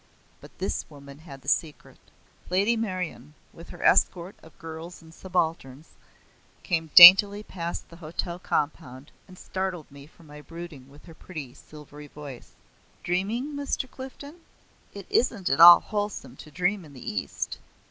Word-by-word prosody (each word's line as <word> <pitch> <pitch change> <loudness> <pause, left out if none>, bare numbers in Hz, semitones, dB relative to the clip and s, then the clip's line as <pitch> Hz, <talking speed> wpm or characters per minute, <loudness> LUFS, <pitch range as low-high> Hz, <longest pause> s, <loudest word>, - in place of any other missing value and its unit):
But - - -17
this - - -3
woman 140 -1 -14
had 140 -4 -13
the - - -18
secret. 150 +1 -3 0.5
Lady 200 +6 +1
Meryon, 180 - -5 0.2
with 165 - -14
her - - -10
escort 180 0 +2
of 160 - -19
girls 165 +2 -10
and 160 -1 -17
subalterns, 160 -6 -4 0.7
came 165 -3 -2
daintily 200 +4 +10
past 170 -4 -7
the 170 - -15
hotel 170 +1 -6
compound, 145 -5 -4 0.2
and 185 -1 -15
startled 185 -5 -5
me 140 0 -14
from 165 +1 -21
my 150 0 -13
brooding 165 -5 -11
with 145 +2 -18
her 165 - -13
pretty 155 -6 -10
silvery 150 -1 -14
voice. 145 -4 -12 0.5
"Dreaming, 215 +11 -2
Mr. 285 -2 -4
Clifden? 275 +5 -11 0.5
It - - -10
isn't 235 - 0
at 140 +4 +1
all 175 +1 +10
wholesome 205 - -5
to 155 - -13
dream 180 +5 -2
in 150 -3 -15
the 130 - -7
East. 100 - -5
170 Hz, 150 wpm, -25 LUFS, 150-190 Hz, 0.7 s, daintily